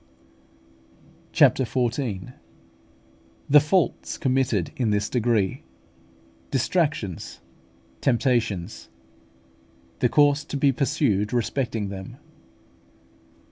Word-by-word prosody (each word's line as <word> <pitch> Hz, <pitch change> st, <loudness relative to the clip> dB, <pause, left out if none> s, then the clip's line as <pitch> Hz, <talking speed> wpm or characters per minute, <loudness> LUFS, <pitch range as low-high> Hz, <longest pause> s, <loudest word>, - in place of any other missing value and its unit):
CHAPTER 130 Hz, -, +4 dB
XIV. 120 Hz, -3 st, -2 dB, 1.1 s
THE 150 Hz, +1 st, +7 dB
FAULTS 155 Hz, +4 st, 0 dB
COMMITTED 130 Hz, -8 st, 0 dB
IN 120 Hz, -4 st, 0 dB
THIS 105 Hz, 0 st, 0 dB
DEGREE 115 Hz, -6 st, 0 dB, 0.9 s
DISTRACTIONS, 135 Hz, -, -1 dB, 0.6 s
TEMPTATIONS 115 Hz, -7 st, 0 dB, 1.1 s
THE -, -, +2 dB
COURSE 145 Hz, 0 st, +3 dB
TO 145 Hz, -, -4 dB
BE 140 Hz, 0 st, +3 dB
PURSUED 105 Hz, -5 st, 0 dB
RESPECTING 115 Hz, -2 st, -1 dB
THEM. 95 Hz, -1 st, -8 dB
120 Hz, 75 wpm, -24 LUFS, 105-140 Hz, 1.1 s, THE